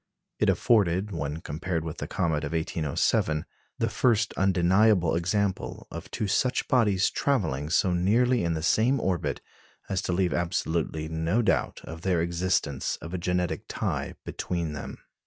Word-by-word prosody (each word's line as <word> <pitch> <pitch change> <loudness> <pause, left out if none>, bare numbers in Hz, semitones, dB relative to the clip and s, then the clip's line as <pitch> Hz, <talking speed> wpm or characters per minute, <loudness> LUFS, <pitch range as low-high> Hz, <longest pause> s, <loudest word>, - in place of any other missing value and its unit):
It - - +3
afforded, 100 -3 +2
when 80 -2 -3
compared 85 +1 -3
with 80 - -5
the - - -4
comet 80 -5 0
of 70 +2 -4
1807, 80 +1 0 0.3
the - - +1
first 110 -3 +2
undeniable 95 0 +3
example 95 +3 -1
of - - -7
two 105 - -2
such 125 +6 +1
bodies 105 -7 +3
travelling 80 - 0
so 90 +2 +2
nearly 115 +7 +3
in 85 -1 0
the 80 - -3
same 120 +9 +3
orbit 95 -6 -1 0.5
as 95 -2 0
to - - -2
leave 90 0 +1
absolutely 80 -2 -1
no 80 +8 0
doubt - - 0
of 80 0 -8
the 90 -1 +1
existence 85 -4 0
of 85 - -9
a 90 - -2
genetic 90 0 -1
tie - - -3
between 85 -4 -3
them. 70 - -6
90 Hz, 155 wpm, -27 LUFS, 80-100 Hz, 0.5 s, It